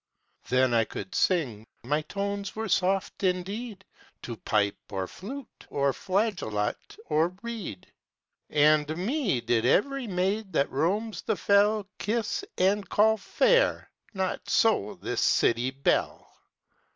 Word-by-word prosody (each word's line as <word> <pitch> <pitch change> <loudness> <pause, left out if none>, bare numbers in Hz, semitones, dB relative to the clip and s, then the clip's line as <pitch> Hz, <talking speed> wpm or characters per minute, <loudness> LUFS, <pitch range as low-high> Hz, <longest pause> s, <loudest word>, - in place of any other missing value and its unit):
Then 130 0 +3
I 115 -1 +4
could 185 - -7
sing 130 - 0 0.2
my 150 +5 0
tones 200 +4 -4
were 220 +1 -3
soft 190 0 0
indeed! 200 +3 -2 0.4
To 120 - -5
pipe 105 -2 0
or 95 -2 -2
flute 255 - -10
or 140 -1 +1
flageolet 185 - -2
or 165 +4 +1
reed: 220 - -6 0.6
And 150 +1 +3
me 205 - 0
did 115 -1 +1
every 255 - +2
maid 195 +2 -1
that 140 - +1
roams 200 +10 -1
the - - -1
fell 205 0 +3
Kiss 225 - -1
and 195 +2 +2
call 220 +1 +4
fair: - - +2 0.2
not 190 -1 -2
so 215 -3 +2
this 120 - -2
city 120 +2 +3
belle. 135 +1 -1
185 Hz, 125 wpm, -27 LUFS, 135-210 Hz, 0.6 s, I